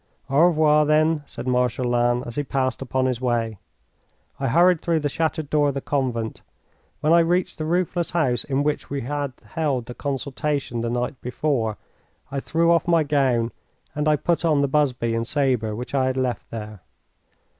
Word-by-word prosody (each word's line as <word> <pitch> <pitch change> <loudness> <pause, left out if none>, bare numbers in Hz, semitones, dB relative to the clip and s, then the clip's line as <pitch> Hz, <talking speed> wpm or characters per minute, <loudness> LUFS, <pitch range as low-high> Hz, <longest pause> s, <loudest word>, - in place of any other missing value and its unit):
"Au 140 - +3
revoir, 155 -3 +4
then," 155 +1 +3
said - - -8
Marshal 125 0 +1
Lannes, 120 0 +1
as 120 - -6
he 145 - -1
passed 130 -2 -1
upon 130 0 0
his 130 -2 -1
way. 115 -4 -1 0.8
I 135 - -1
hurried 170 +5 +4
through 165 -2 +1
the 145 - 0
shattered 160 0 -1
door 150 0 +2
of 140 - -1
the - - -1
convent. 125 -6 -2 0.6
When 155 +2 +3
I 170 - +7
reached 175 +2 +1
the 155 - -2
roofless 175 +1 0
house 135 -8 +1
in 140 0 0
which 150 0 -2
we 140 -1 -3
had 145 +2 -3
held 145 -7 -1
the 125 - -7
consultation 140 -2 -3
the 115 - -2
night 125 +2 -2
before, 125 -4 -1 0.5
I 140 - -2
threw 165 +4 +1
off 170 +1 +2
my 170 -2 +4
gown 130 -5 +1 0.4
and 150 +1 -1
I 155 - +5
put 170 +4 0
on 155 -4 +3
the 140 - +2
busby 130 -5 +1
and 115 0 -1
sabre 125 -7 +1
which 125 +4 -7
I 135 -2 +2
had 130 0 -1
left 125 -3 -2
there. 105 -3 -7
140 Hz, 190 wpm, -23 LUFS, 125-155 Hz, 0.8 s, I